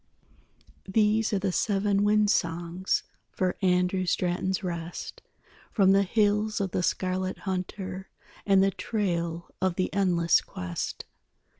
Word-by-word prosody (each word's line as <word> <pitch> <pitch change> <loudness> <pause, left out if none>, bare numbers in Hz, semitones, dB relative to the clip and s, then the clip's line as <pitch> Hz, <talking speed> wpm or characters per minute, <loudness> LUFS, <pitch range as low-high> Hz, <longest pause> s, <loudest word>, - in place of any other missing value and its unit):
_These 215 +1 +3
are 205 - +2
the 190 0 -1
seven 200 +1 +1
wind 210 0 +4
songs 170 +2 -1 0.3
For 185 -1 -1
Andrew 180 0 +2
Straton's 180 +3 0
rest, 170 -1 -5 0.5
From 195 -3 +4
the 195 0 +5
hills 210 +1 +1
of 195 -2 -1
the - - 0
Scarlet 185 +1 -1
Hunter 190 0 -4 0.3
And 195 -1 +4
the 195 - +3
trail 170 -6 -2
of 185 -2 +1
the 185 - -1
endless 175 -4 +3
quest. 90 -1 -5
190 Hz, 125 wpm, -27 LUFS, 180-200 Hz, 0.5 s, the